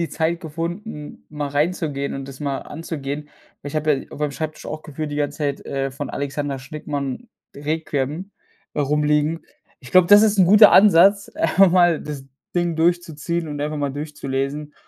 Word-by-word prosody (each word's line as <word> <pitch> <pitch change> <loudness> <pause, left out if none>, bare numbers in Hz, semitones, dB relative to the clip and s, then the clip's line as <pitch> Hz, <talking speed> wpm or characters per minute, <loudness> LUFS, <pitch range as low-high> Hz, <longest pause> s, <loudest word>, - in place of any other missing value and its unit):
die 170 - -1
Zeit 165 +1 -1
gefunden, 165 +1 -6
mal 150 -2 -4
reinzugehen 145 -1 -1
und 135 -1 -6
das 135 -1 -11
mal 140 -2 -2
anzugehen. 150 -2 -6 0.3
Ich 145 +2 -5
habe 155 0 +2
ja 135 - -3
auf - - -9
meinem 150 -2 -1
Schreibtisch 155 +1 -5
auch 155 0 -6
gefühlt 150 0 -5
die - - -3
ganze 145 -1 -2
Zeit, 145 -2 -2
äh, 135 0 -2
von 140 0 -5
Alexander 140 0 -3
Schnickmann: 145 - -5 0.3
Requiem, 150 +3 -3 0.5
rumliegen. 150 +2 +1 0.4
Ich 130 - -13
glaube, 185 -2 +6
das 205 +1 +8
ist 210 -2 +2
'n 185 - +7
guter 210 +2 +8
Ansatz, 200 +1 +6
einfach 180 +3 +3
mal 175 -3 +4
das 145 -3 -7 0.3
Ding 175 -1 0
durchzuziehen 170 0 0
und 145 -1 -5
einfach 150 +1 -2
mal 145 -2 -2
durchzulesen 145 0 -4
150 Hz, 170 wpm, -21 LUFS, 145-170 Hz, 0.5 s, das